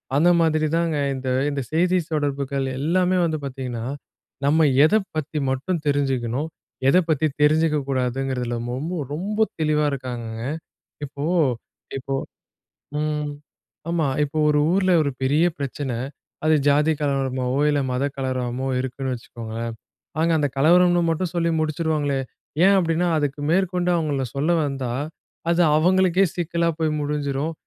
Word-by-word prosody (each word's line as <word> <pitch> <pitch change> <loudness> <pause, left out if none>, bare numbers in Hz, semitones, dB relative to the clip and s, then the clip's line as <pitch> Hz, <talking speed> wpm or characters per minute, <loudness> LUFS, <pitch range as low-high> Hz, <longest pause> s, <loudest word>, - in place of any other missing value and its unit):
அந்த 165 +5 +5
மாதிரி 155 -1 +2
தாங்க 165 -3 0 0.2
இந்த 130 0 -4 0.2
இந்த 140 -1 -2
செய்தி 180 +3 +2
தொடர்புகள் 140 -3 -1
எல்லாமே 180 +4 +2
வந்து 160 -2 -1
பாத்தீங்கன்னா, 125 -4 -5 0.6
நம்ம 155 +2 +4 0.2
எத 210 - +3 0.2
பத்தி 155 0 -3
மட்டும் 155 +5 -2
தெரிஞ்சுக்கணும், 135 -1 0 0.4
எதை 180 +7 +6
பத்தி 155 0 +2 0.2
தெரிஞ்சுக்க 155 +1 +4
கூடாதுங்கிறதில 125 -1 -1
மொம்போ 155 +8 -3 0.2
ரொம்போ 210 +7 0 0.2
தெளிவா 150 -1 +2
இருக்காங்கங்க. 120 -4 -5 0.6
இப்போ 140 +1 -6 0.7
இப்போ, 135 +1 -4 0.9
ம். 150 -1 -1 0.6
ஆமா. 165 -4 +1 0.2
இப்ப 145 +2 -5
ஒரு 150 0 +3
ஊர்ல 185 0 +2
ஒரு 140 - -1
பெரிய 145 +6 +3
பிரச்சன. 140 -1 -3 0.5
அது 155 0 +5
ஜாதி 150 +2 +4
கலவரமாவோ, 135 -2 0
இல்ல 145 -1 +2
மத 125 +2 0
கலவராமோ 130 -1 -2
இருக்குன்னு 130 0 -3
வச்சுக்கோங்களேன். 115 -1 -6 0.5
அங்க 165 +1 +2
அந்த 145 -1 +2
கலவரம்ன்னு 175 +4 +5
மட்டும் 165 +1 -1
சொல்லி 170 -1 +1
முடிச்சிடுவாங்களே. 155 -3 0 0.5
ஏன் 200 - +6
அப்டீன்னா, 170 0 +1
அதுக்கு 145 -1 -1
மேற்கொண்டு 180 -1 +1
அவங்கள 145 -5 0
சொல்ல 155 +5 +2
வந்தா, 135 -3 -3 0.6
அது 175 +1 +3 0.2
அவங்களுக்கே 185 +2 +4
சிக்கலா 170 -1 0
போய் 160 -1 +1
முடிஞ்சுரும். 145 +1 -2
150 Hz, 130 wpm, -23 LUFS, 135-165 Hz, 0.9 s, எதை